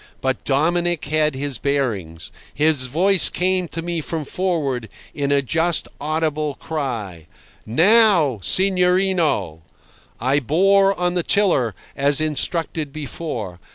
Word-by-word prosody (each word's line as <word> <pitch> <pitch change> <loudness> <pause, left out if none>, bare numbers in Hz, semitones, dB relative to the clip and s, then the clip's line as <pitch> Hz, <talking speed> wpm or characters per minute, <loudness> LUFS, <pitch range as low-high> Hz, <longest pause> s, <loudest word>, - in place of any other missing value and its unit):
But 130 -2 -2
Dominic 170 +4 0
had 150 0 0
his 140 -2 -3
bearings. 100 - -2 0.2
His 150 -3 +1
voice 185 +8 +3
came 185 0 0
to 165 0 -6
me 170 -1 -3
from 155 0 -5
forward, 140 - -2 0.2
in 140 -1 -2
a 140 -1 +2
just 165 +4 0
audible 155 -1 -2
cry: 115 - -5 0.4
"Now, 170 - +4
signorino!" 180 - +1 0.6
I 135 +3 +1
bore 195 - +2
on 180 0 0
the 180 - 0
tiller, 165 - +1 0.2
as 140 +1 +2
instructed 155 0 -1
before. 135 - -6
155 Hz, 120 wpm, -20 LUFS, 135-175 Hz, 0.6 s, Now